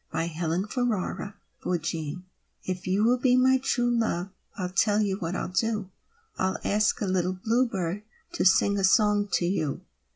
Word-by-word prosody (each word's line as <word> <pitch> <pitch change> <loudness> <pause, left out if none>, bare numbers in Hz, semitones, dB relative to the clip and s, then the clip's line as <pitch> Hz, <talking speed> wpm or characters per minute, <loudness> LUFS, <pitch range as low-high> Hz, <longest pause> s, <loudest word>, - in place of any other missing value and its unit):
A 165 - 0
VALENTINE 170 +4 -2
TO 215 -4 -2 0.3
CATHERINE 165 -1 -3 0.4
If 185 0 -4
you 195 +3 +2
will 245 +2 +3
be 250 0 +3
my 260 +1 +4
True 245 -2 0
Love, 195 -5 -1 0.3
I'll 180 -2 -2
tell 205 +2 +2
you 200 -2 0
what 175 -1 -3
I'll - - -3
do, 210 -1 -1 0.5
I'll 190 0 0
ask 210 +1 +1
a - - +1
little 185 -1 0
bluebird 200 -3 -1 0.3
To - - 0
sing 200 +2 +4
a - - -1
song 205 +1 +4
to 175 - +2
you. 160 -6 -1
195 Hz, 165 wpm, -27 LUFS, 180-220 Hz, 0.5 s, my